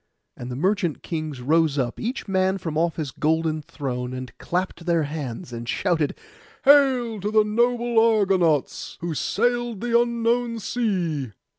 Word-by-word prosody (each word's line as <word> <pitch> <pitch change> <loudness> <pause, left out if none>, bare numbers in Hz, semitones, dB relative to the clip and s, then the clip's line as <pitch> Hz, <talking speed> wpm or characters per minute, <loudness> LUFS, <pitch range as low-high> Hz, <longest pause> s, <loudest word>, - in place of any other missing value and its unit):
And 120 - -7
the 125 - -4
merchant 185 - 0
kings 155 -6 -4
rose 155 +2 +2
up, 125 -3 -1
each 240 +2 -3
man 190 0 +1
from 165 -5 -5
off 165 +1 +1
his 150 -4 -4
golden 160 0 0
throne, 125 -4 -4
and 130 -3 -7
clapped 180 -1 -3
their 170 -2 +3
hands, 140 -5 -5
and 115 0 -6
shouted, 165 -6 0 0.5
'Hail 260 -6 +5
to 205 +2 -2
the 215 0 +4
noble 235 +2 +2
Argonauts, 195 - +2
who 170 -1 -2
sailed 240 - 0
the 235 0 +3
unknown 235 0 0
sea! 180 - -2
175 Hz, 150 wpm, -24 LUFS, 150-230 Hz, 0.5 s, Hail